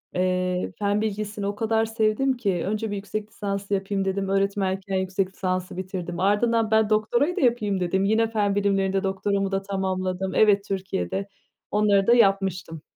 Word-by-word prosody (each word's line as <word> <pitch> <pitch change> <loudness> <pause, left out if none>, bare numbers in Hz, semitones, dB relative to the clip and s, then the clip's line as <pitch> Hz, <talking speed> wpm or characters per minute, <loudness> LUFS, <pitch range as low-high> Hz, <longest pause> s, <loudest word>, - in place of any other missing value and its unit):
eee, 185 0 0
fen 205 0 +1
bilgisini 210 -1 -3
o 205 - -2
kadar 225 0 +1
sevdim 225 +4 +1
ki 195 -7 -1
önce 215 +2 -2
bir - - -2
yüksek 205 +1 -5
lisans 200 -2 -4
yapayım 195 0 -1
dedim. 195 0 -1
Öğretmenken 195 0 0
yüksek 190 0 -1
lisansı 185 -1 -3
bitirdim. 180 -2 -5
Ardından, 220 +3 +2
ben 220 -1 +3
doktorayı 235 +10 +1
da - - -2
yapayım 215 -6 +1
dedim. 185 +2 0
Yine 220 +2 +3
fen 205 -3 +1
bilimlerinde 195 -1 +1
doktoramı 195 0 -1
da 195 - 0
tamamladım. 190 -1 -2
Evet, 205 -2 +4
Türkiye'de 190 - -3 0.4
onları 205 -2 +3
da 235 - +6
yapmıştım. 195 -7 +1
200 Hz, 160 wpm, -24 LUFS, 190-215 Hz, 0.4 s, da